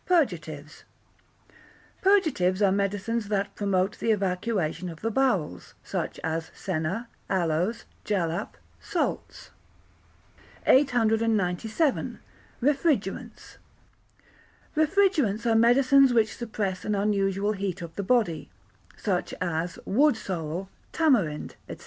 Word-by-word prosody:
Purgatives 160 - -1 1.2
Purgatives 315 - +3
are 195 - +5
medicines 200 +3 -1
that 200 -1 -1
promote 195 -1 0
the - - -1
evacuation 185 -3 0
of 165 -1 -10
the 225 - -1
bowels, 200 - 0
such - - -4
as 160 0 -2
senna, 185 +6 -3 0.2
aloes, 180 +4 0 0.2
jalap, 180 -1 -2 0.2
salts. - - -3 1.1
897. 225 - +2 0.5
Refrigerants 275 - -1 1.2
Refrigerants 310 - +2
are 230 - +3
medicines 255 +3 +5
which 220 -2 +2
suppress 210 -6 -3
an 210 - -1
unusual 200 0 +1
heat 195 -3 -3
of 165 -1 -9
the - - -2
body, 205 -8 +1 0.5
such 185 -4 -2
as 170 -1 -2
wood 275 +4 +3
sorrel, 180 -3 -4 0.2
tamarind, 225 - +1
&c. - - -6
205 Hz, 100 wpm, -27 LUFS, 180-235 Hz, 1.2 s, are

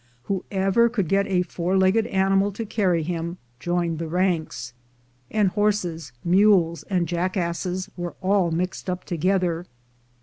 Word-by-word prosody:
Whoever 195 - +1
could 210 -7 -1
get 200 +3 +2
a 180 -2 +2
four 180 +2 -1
legged 190 +4 +3
animal 195 +1 +2
to 225 +3 -4
carry 185 -6 +1
him, 170 +1 -3 0.2
joined 170 0 -1
the 165 - -3
ranks; 160 -8 -1 0.6
and 210 -3 +2
horses, 180 - -1
mules, 175 -3 +4
and 180 -3 +1
jackasses 180 +1 -2
were 175 -1 -5
all 190 -2 +2
mixed 180 +3 -2
up 180 0 -3
together. 175 0 0
180 Hz, 135 wpm, -24 LUFS, 170-195 Hz, 0.6 s, mules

